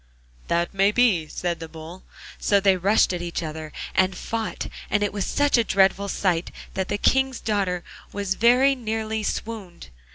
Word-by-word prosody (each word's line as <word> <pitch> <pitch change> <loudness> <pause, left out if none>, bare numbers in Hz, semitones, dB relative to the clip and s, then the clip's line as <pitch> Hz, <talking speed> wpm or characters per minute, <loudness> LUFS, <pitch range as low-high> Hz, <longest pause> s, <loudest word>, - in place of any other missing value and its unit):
'That 170 +2 0
may 195 +1 +3
be,' 210 -9 +3
said 175 +2 -3
the 165 0 -7
Bull; 160 +3 -10 0.4
so 200 - +3
they 195 -1 +4
rushed 190 +1 +3
at 175 - -3
each 170 0 -3
other, 155 0 -6 0.2
and 185 -1 +2
fought, 225 -1 -3 0.2
and 205 -1 +1
it 205 - -1
was 200 -2 -2
such 285 -3 +2
a - - +4
dreadful 195 -1 +2
sight 180 -4 0 0.2
that 190 -1 -2
the 205 - -1
King's 265 +3 +2
daughter 195 -5 -1 0.3
very 235 +7 +3
nearly 220 -3 -3
swooned. 210 - -5
195 Hz, 165 wpm, -24 LUFS, 175-220 Hz, 0.4 s, they